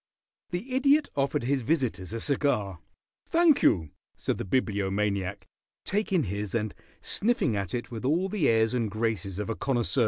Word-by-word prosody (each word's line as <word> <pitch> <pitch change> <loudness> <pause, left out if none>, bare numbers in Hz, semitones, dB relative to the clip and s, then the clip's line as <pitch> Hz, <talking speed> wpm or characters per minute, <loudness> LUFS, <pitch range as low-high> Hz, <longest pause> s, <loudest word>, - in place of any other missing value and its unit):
The 195 +9 -4
Idiot 280 +3 +4
offered 135 -3 0
his 135 +2 +1
visitors 115 - -1
a 115 - -3
cigar. 110 - 0 0.5
"Thank 330 -3 +5
you," 80 -5 +3 0.3
said - - -2
the - - -3
Bibliomaniac, 100 -3 0 0.4
taking 195 -4 +1
his 100 +2 -3
and 110 -2 -1 0.3
sniffing 215 - +1
at 100 -1 -2
it 120 - -5
with 115 -1 -6
all 165 +8 +2
the 190 -6 +1
airs 115 +1 +3
and 115 -3 0
graces 105 -3 -2
of 105 - -3
a 115 - -2
connoisseur. 130 0 0
115 Hz, 160 wpm, -28 LUFS, 100-155 Hz, 0.5 s, Thank